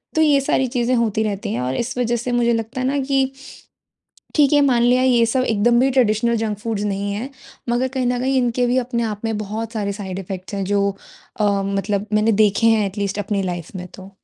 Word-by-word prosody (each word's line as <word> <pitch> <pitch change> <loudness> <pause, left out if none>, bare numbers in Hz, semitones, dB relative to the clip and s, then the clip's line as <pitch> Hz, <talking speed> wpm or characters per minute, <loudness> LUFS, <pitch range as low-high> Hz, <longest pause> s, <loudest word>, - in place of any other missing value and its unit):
तो 315 - +3
ये 295 -3 +4
सारी 265 -1 +1
चीज़ें 245 0 0
होती 220 -2 +1
रहती 205 -2 -3
हैं। 120 - -2
और 125 +1 -2
इस 245 - -3
वज़ह 240 -1 +1
से 245 +2 -3
मुझे 235 -1 +2
लगता 230 +3 -3
है - - -1
ना 280 +2 0
कि 270 -1 +1 1.0
ठीक 290 -2 +4
है 290 - +5
मान 250 -4 +3
लिया 250 +1 +4
ये 245 -3 +4
सब 255 +3 +1
एकदम 235 +1 +2
भी 265 +1 +3
ट्रेडिशनल 235 -2 +2
जंक 210 -2 -2
फूड्स 220 -1 -3
नहीं 200 0 -2
है। 220 +6 -4 0.4
मगर 245 +2 +1
कहीं 255 -1 0
न 245 0 0
कहीं 265 +1 0
इनके 245 0 +1
भी 245 +1 +1
अपने 240 -1 -1
आप 210 -2 -4
में 225 -1 -1
बहुत 215 +2 -5
सारे 205 -3 -2
साइड 195 -2 -6
इफेक्ट्स 190 +1 -7
हैं 195 -1 -2
जो 200 +1 +1 0.5
अ, - - +3 0.2
मतलब 200 +1 -1
मैंने 215 +1 +3
देखे 210 +2 +2
हैं 220 -2 +4
एटलीस्ट 200 0 -3
अपनी 205 -1 -1
लाइफ़ 175 0 -5
में 180 - -6
तो। 190 0 -11
225 Hz, 230 wpm, -20 LUFS, 200-250 Hz, 1.0 s, है